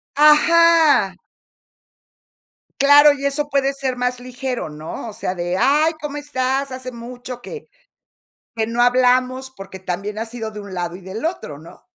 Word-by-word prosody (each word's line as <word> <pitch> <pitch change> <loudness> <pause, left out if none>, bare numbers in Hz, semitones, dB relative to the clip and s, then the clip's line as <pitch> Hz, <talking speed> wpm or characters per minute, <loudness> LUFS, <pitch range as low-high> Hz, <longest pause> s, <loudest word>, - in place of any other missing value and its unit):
Ajá. 325 +1 +5 1.6
Claro, 290 +1 +7
y 280 0 -4
eso 290 +1 -1
puede 275 0 +1
ser 265 -2 -3
más 250 0 -1
ligero, 250 - -5
¿no? 155 +9 -7
O - - -11
sea, 185 -2 -4
de, 175 +1 -2
ay, 305 +4 +3
¿cómo 295 -1 -5
estás?, 270 -1 -2
hace 255 0 -6
mucho 245 +1 -9
que, 455 - -9 0.9
que 220 -1 0
no 235 +1 -1
hablamos, 255 +1 +2
porque 195 -4 -11
también 200 +3 -5
ha 225 - -2
sido 225 -1 -6
de 210 - -8
un 200 -2 -10
lado 175 -1 -4
y 190 - -11
del 190 - -6
otro, 320 - -4
¿no? 165 - -16
255 Hz, 160 wpm, -20 LUFS, 210-280 Hz, 1.6 s, Claro